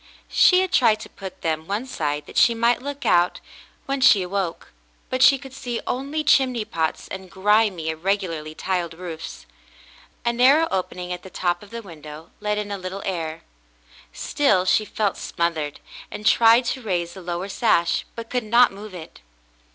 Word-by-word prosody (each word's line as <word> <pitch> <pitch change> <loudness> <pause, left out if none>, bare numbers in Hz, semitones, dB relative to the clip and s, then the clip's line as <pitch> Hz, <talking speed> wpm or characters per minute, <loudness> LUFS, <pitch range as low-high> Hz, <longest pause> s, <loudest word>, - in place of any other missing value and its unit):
She 365 0 +6
had 375 -1 -2
tried 225 -4 +4
to - - -9
put 190 -2 -10
them 160 0 -2
one 205 +5 -2
side 150 - -3
that - - -13
she 235 - +5
might 235 +2 +2
look 285 +1 -6
out 175 +1 +3 0.5
when 275 0 -2
she 205 -6 +6
awoke, 185 -2 -3 0.4
but 255 0 -1
she 275 +1 +7
could 270 -1 -12
see 245 -2 -4
only 280 +4 -2
chimney 255 -6 +3
pots 160 -4 -2
and 190 -1 -8
grimy, 195 -3 +2
irregularly 165 -2 -2
tiled 175 -3 -2
roofs. 165 -2 -8 0.8
A 235 - +2
narrow 275 +7 +5
opening 180 -1 -3
at 180 - -7
the 190 - -11
top 175 -1 -1
of 205 - -14
the 230 +1 -7
window 155 -3 -11
let 210 0 -1
in 210 -1 -4
a 200 - -4
little 185 +2 -6
air; 165 -4 -4 0.7
still 230 - +1
she 215 +3 +3
felt 205 -2 -1
smothered, 160 -4 -2 0.3
and 210 - -8
tried 230 +2 +5
to 260 - -2
raise 175 -6 -2
the 190 - -10
lower 175 +1 -4
sash, 195 -5 +1
but 230 -1 -8
could 250 -2 0
not 235 +3 +5
move 200 -1 -10
it. 160 -3 -10
195 Hz, 175 wpm, -23 LUFS, 175-235 Hz, 0.8 s, she